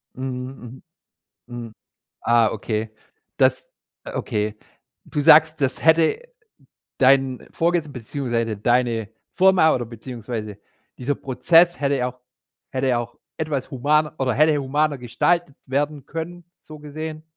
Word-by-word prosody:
Mhm, 130 -1 -7 0.7
mhm. 120 - -9
Mhm. 115 - -13 0.5
Ah, 120 -1 +4
okay. 110 0 -3 0.4
Das - - +2 0.3
äh, - - -7
okay. 105 0 -2 0.5
Du 150 - -3
sagst, 155 +2 +6
das 130 -2 -1
hätte 160 - +4 0.8
dein 135 -1 +3
Vorges 165 -2 0
beziehungsweise 115 -3 -3
deine 120 -1 +1 0.2
Firma 185 -4 +4
oder 120 - -2
beziehungsweise 115 -3 -7 0.4
dieser 135 +3 -1
Prozess 165 +7 +3
hätte 140 0 +1
ja 125 -1 0
auch 125 - -28 0.5
hätte 130 0 -1
ja 120 -2 +2
auch 120 - -7 0.2
etwas 150 -4 -3
humaner 150 +4 +1
oder 130 -2 +1
hätte 155 +4 +4
humaner 145 +2 0
gestaltet 155 +6 0
werden 145 +1 -2
können, 175 +2 -6 0.2
so 155 -1 -12
gesehen. 155 +1 -7
135 Hz, 130 wpm, -22 LUFS, 120-155 Hz, 0.8 s, sagst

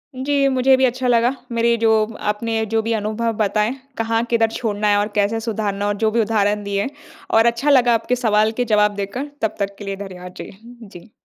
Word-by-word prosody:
जी, 275 +2 +1
मुझे 265 0 +4
भी 260 - +3
अच्छा 255 +1 -1
लगा। 240 0 +3 0.2
मेरे 235 0 +2
जो 225 -1 +4 0.4
आपने 220 +1 -1
जो 225 - +3
भी 225 +1 -2
अनुभव 220 +2 -1
बताएँ, 215 +2 +1 0.2
कहाँ 225 0 0
किधर 225 -1 +2
छोड़ना 210 -2 -2
है 205 - +4
और 205 - 0
कैसे 210 +2 +1
सुधारना 205 -3 -2
और 205 - +1
जो 220 +1 +1
भी 230 +1 +2
उदाहरण 210 -1 0
दिए 200 +3 -2 0.4
और 225 +1 +5
अच्छा 235 +5 +1
लगा 250 -4 +5
आपके 230 +2 0
सवाल 215 -3 +2
के 245 - +2
जवाब 210 0 +3
देकर 225 +9 -5
तब 220 - -1
तक 200 0 -2
के 205 - -9
लिए 195 0 -3
धन्यवाद। 180 -1 -10
जी। - - -8 0.3
जी। 200 0 -14
225 Hz, 210 wpm, -20 LUFS, 205-235 Hz, 0.4 s, और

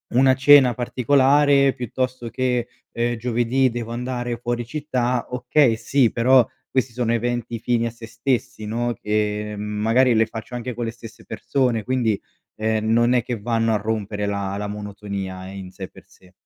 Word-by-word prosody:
una 130 0 +5
cena 130 -2 +6
particolare, 140 +3 +3
piuttosto 125 0 -3
che, 125 -1 -1 0.3
ehm, 120 0 0
giovedì 120 +3 +1
devo 115 -1 -5
andare 120 0 -3
fuori 120 0 -3
città, 125 -4 -1
okay, 125 0 +2
sì, 125 +1 +2
però 125 0 +4 0.2
questi 130 -3 -1
sono 120 -1 -1
eventi 120 -1 -2
fini 115 0 0
a - - -5
se 115 0 -11
stessi, 120 0 -2
no, 120 +2 -1
che 105 0 -1
magari 110 +5 +2
le 110 - +4
faccio 110 +2 -8
anche 125 +1 -4
con 120 0 -3
le 115 - -3
stesse 115 -1 -13
persone, 125 -5 -1
quindi, 120 -5 0 0.4
ehm, 110 0 -1
non 120 +2 +4
è 125 -2 +2
che 120 -3 -4
vanno 115 +1 0
a - - +3
rompere 105 -1 -3
la 100 -1 -2
la 105 0 -3
monotonia 100 -2 -6
in 95 -1 -8
sé 95 -2 -7
per - - -17
sé. 90 -1 -22
120 Hz, 170 wpm, -22 LUFS, 110-125 Hz, 0.4 s, cena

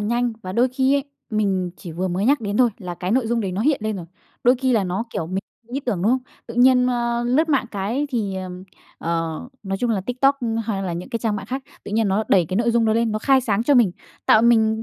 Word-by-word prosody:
nhanh 235 +3 0
và 185 - -5
đôi 245 +5 +3
khi 265 +2 +2
ấy 280 - +1 0.3
mình 195 -4 0
chỉ 170 - -9
vừa 185 +3 -2
mới 185 +3 -1
nhắc 280 +1 +4
đến 205 -1 -2
thôi, 250 -2 +4
là 180 -2 -6
cái 180 +2 -4
nội 250 0 +2
dung 235 +1 0
đấy 190 -3 -2
nó 195 - -2
hiện 285 +1 +2
lên 215 -1 -1
rồi. 175 -3 -7 0.4
Đôi 245 +1 +6
khi 260 0 +1
là 215 -4 +2
nó, 185 +5 -2
kiểu, 160 - -3
mình 185 +2 -2 0.3
có 240 - -17
ý 275 - -1
tưởng, 210 -10 -2
đúng 210 - +3
hông? 260 - +3 0.3
Tự 230 - -8
nhiên, 250 +1 +5
nơ, 240 -1 0
lướt 275 +7 +2
mạng 275 -5 +2
cái 220 +8 -2
thì, 210 -6 -1
ờm, 185 0 -6 0.3
ờ, 165 -1 -2 0.2
nói 195 -1 -3
chung 245 - 0
là 210 -4 +1
TikTok 260 +6 +1 0.3
hay 200 -3 -2
là 180 -3 -2
những 175 +6 -5
cái 235 - -2
trang 220 -2 -1
mạng 200 0 -6
khác, 265 +4 -4 0.2
tự - - -7
nhiên 220 -2 +2
nó 205 +3 +1
đẩy 180 -4 +4
cái 185 - -2
nội 235 +2 +2
dung 235 0 +2
đó 220 - +3
lên, 230 -1 +1
nó 215 - -1
khai 265 +4 +4
sáng 225 -3 0
cho 285 +4 +3
mình, 230 -8 +4 0.3
tạo 220 - +6
mình, 220 -1 +3
225 Hz, 275 wpm, -22 LUFS, 190-245 Hz, 0.4 s, Đôi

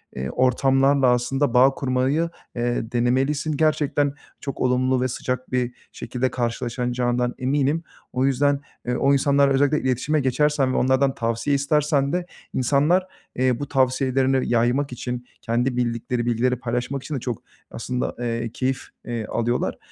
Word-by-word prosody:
eee, 65 +1 -3
ortamlarla 135 - +3
aslında 125 +2 0
bağ 130 +2 +6
kurmayı, 135 +5 0 0.3
eee, 120 -1 -1
denemelisin. 135 +5 +1
Gerçekten 150 -2 +1 0.3
çok 140 - -5
olumlu 130 0 +2
ve 130 - +1
sıcak 125 +1 -4
bir 125 -1 0 0.2
şekilde 130 0 -3
karşılaşacağından 120 +1 -1
eminim. 140 +4 +1 0.3
O 130 +1 +1
yüzden, 140 +1 +2 0.3
eee, 125 - 0
o 140 +3 +3
insanlarla 140 0 +3
özellikle 145 +2 +2
iletişime 130 +4 0
geçersen 135 0 +1
ve - - 0
onlardan 130 +1 +2
tavsiye 115 +4 0
istersen 140 0 +1
de 180 0 -1 0.3
insanlar, 150 +9 +2 0.3
eee, 125 -1 +1
bu 145 - -4
tavsiyelerini 130 0 +1
yaymak 120 +4 +1
için, 125 0 -5 0.2
kendi 125 +2 0
bildikleri 120 0 -1
bilgileri 120 +2 +1
paylaşmak 125 +3 -3
için 155 - -4
de 135 - -2
çok 120 -2 -4 0.3
aslında, 125 +2 -3
eee, 115 -1 -2
keyif, 130 0 -1 0.2
eee, 120 -2 -3
alıyorlar. 120 +2 -1
130 Hz, 140 wpm, -23 LUFS, 125-140 Hz, 0.3 s, bağ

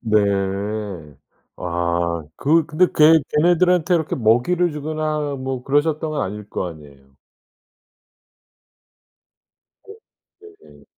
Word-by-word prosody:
네. 110 -2 +2 1.4
아 85 -1 -2
그 160 +3 +2
근데 170 +3 +3
걔 155 +1 +6 0.2
걔네들한테 175 +1 +3
이렇게 160 -3 -1
먹이를 135 +10 +2
주거나 150 -1 -3
뭐 130 -1 -4
그러셨던 150 +3 0
건 150 - -2
아닐 105 +2 -6
거 - - -3
아니에요. 70 -4 -15 2.7
네 415 - -10 0.7
네네. - - -19
145 Hz, 195 characters per minute, -20 LUFS, 100-160 Hz, 2.7 s, 걔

